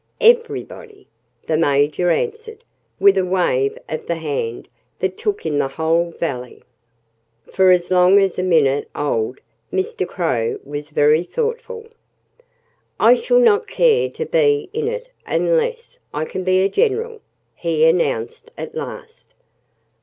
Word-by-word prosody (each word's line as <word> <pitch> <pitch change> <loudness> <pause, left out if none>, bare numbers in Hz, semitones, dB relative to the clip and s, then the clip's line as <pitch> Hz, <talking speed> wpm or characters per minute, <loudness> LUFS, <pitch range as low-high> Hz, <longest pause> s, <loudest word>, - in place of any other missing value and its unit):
"Everybody!" 465 -2 +1 0.4
the 155 - 0
Major 145 +3 +2
answered, 450 - -3 0.4
with 400 -1 +5
a - - +1
wave 175 -8 0
of 155 - -6
the 170 - -1
hand 145 -7 -4 0.3
that 185 0 -2
took 415 - -3
in 145 -2 0
the - - +1
whole 160 +4 0
valley. 125 -7 -5 0.9
For 190 -1 +4
as 180 0 +3
long 180 +2 +5
as 195 -2 0
a - - +1
minute 150 -6 +2
old 125 -4 -2 0.3
Mr. 440 +5 -2
Crow 460 -3 -1
was 145 +1 -7
very 150 +2 +3
thoughtful. 465 - -4 1.1
"I - - +7
shall - - +1
not 455 -2 +3
care 475 -2 +2
to 470 - -5
be 435 -5 +1
in 450 0 -2
it - - -4 0.2
unless 485 0 -1
I 150 +1 -3
can 185 - -5
be 185 0 +2
a - - +3
general," 450 - -1 0.3
he 160 -2 +1
announced 160 - 0
at - - -7
last. 465 0 -9
190 Hz, 140 wpm, -19 LUFS, -, 1.1 s, I